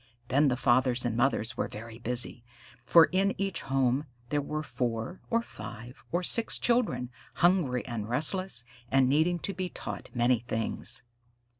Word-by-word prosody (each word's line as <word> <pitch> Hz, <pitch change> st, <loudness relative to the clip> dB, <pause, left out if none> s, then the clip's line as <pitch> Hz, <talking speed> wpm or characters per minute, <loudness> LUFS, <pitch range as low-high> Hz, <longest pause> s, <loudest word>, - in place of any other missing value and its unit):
Then 145 Hz, +3 st, +3 dB
the 125 Hz, -2 st, +1 dB
fathers 125 Hz, 0 st, +2 dB
and 120 Hz, -2 st, -1 dB
mothers 120 Hz, -1 st, 0 dB
were -, -, -1 dB
very 115 Hz, +2 st, -10 dB
busy, 120 Hz, 0 st, +1 dB, 0.4 s
for 165 Hz, +6 st, +7 dB
in 195 Hz, +2 st, +1 dB
each 195 Hz, -2 st, -1 dB
home 135 Hz, +1 st, 0 dB, 0.2 s
there 145 Hz, +1 st, 0 dB
were 155 Hz, +2 st, -4 dB
four 120 Hz, +4 st, -4 dB
or 230 Hz, 0 st, +1 dB
five 120 Hz, -, -10 dB
or 175 Hz, +2 st, 0 dB
six 230 Hz, +5 st, +2 dB
children, 235 Hz, -, +1 dB, 0.2 s
hungry 170 Hz, -9 st, +2 dB
and 110 Hz, -3 st, -5 dB
restless, 150 Hz, -, +3 dB, 0.2 s
and 135 Hz, -1 st, +3 dB
needing 160 Hz, +6 st, +2 dB
to 200 Hz, -, -3 dB
be 185 Hz, -2 st, -4 dB
taught -, -, -7 dB
many 120 Hz, 0 st, +2 dB
things. 115 Hz, +1 st, -1 dB
130 Hz, 155 wpm, -29 LUFS, 120-175 Hz, 0.4 s, for